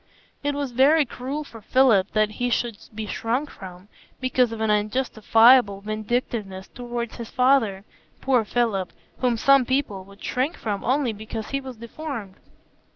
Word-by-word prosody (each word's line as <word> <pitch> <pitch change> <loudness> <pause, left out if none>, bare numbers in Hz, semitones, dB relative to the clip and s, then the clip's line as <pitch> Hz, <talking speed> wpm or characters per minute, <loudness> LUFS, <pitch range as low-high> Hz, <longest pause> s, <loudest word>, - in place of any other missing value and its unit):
It 290 0 -1
was 285 -3 -3
very 285 +5 +4
cruel 270 +5 -5
for 230 -6 -13
Philip 220 -5 +3
that 215 -1 +2
he 245 +3 -2
should 240 -1 0 0.2
be 220 0 -4
shrunk 240 +7 -2
from, 185 0 -11 0.3
because 255 -2 +1
of 225 - -6
an 220 -1 +1
unjustifiable 220 0 +4
vindictiveness 215 -2 -3
toward 240 -1 -5
his 230 -2 -8
father,—poor 250 0 +1
Philip, 215 -5 -1 0.3
whom 245 -2 +1
some 275 +3 +5
people 250 -7 -1
would 200 +1 -16
shrink 260 +6 -1
from 205 -3 -3
only 255 -2 +1
because 220 +1 -7
he 275 0 -1
was 260 -3 -9
deformed. 235 -3 -7
235 Hz, 150 wpm, -24 LUFS, 210-260 Hz, 0.3 s, some